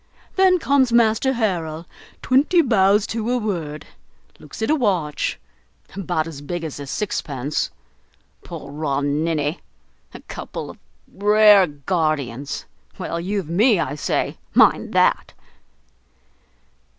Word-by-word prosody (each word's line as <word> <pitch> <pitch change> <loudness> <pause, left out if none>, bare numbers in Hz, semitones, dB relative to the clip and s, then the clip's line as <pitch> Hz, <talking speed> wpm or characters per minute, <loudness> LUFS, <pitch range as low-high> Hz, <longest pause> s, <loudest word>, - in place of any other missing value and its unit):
Then 375 -1 +5
comes 280 -6 +2
Master 235 +3 +3
Harrel 170 -8 -2 0.4
twenty 300 +7 +3
bows 205 -4 +3
to 225 0 -3
a 250 - +1
word, 170 - -4 0.5
looks 150 +9 -8
at 220 - +1
a - - +4
watch, 180 - -1 0.6
about 175 -5 -1
as 155 -4 -8
big 175 +3 -5
as 155 -3 -6
a 140 - -7
sixpence, 145 -6 -2 0.7
poor - - -9
raw 145 -2 -2
ninny! 150 +1 -1 0.5
a - - -10
couple - - -7
of - - -18 0.3
rare 210 -1 +6
guardians! 145 -4 -2 0.3
Well, 170 - -4
you've 190 0 -3
me, 205 +5 +3
I 145 -4 -1
say; 145 - -2 0.2
mind - - +4
that!" - - +2
175 Hz, 120 wpm, -21 LUFS, 150-220 Hz, 0.7 s, rare